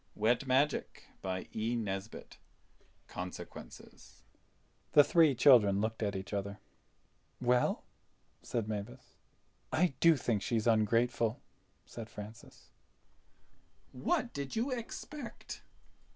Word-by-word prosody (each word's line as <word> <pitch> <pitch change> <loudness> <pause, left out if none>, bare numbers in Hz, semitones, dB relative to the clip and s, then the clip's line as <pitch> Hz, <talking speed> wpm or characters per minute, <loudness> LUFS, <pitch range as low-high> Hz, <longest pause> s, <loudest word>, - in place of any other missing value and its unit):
CHAPTER 130 +6 +3 0.4
FIVE 95 -1 -3 1.6
Consequences 90 0 -9 0.7
THE 145 - +9
THREE 160 -3 +4
CHILDREN 115 -7 +6
looked 110 +2 -2
at 100 -2 -1
each 95 +2 -5
other. 100 0 -3 0.8
"Well!" 125 0 +2 0.6
said 115 -3 -2
Mavis. 100 - -6 0.5
"I 175 -1 +2
do 165 -2 +6
think 115 -5 0
she's 110 0 0
ungrateful," 115 +1 +2 0.5
said 115 -2 -8
Francis. 105 +3 -11 1.2
"What 305 -9 -1
did 140 -2 -4
you 235 +5 0
expect?" 250 +2 -6
120 Hz, 90 wpm, -33 LUFS, 105-145 Hz, 1.6 s, THE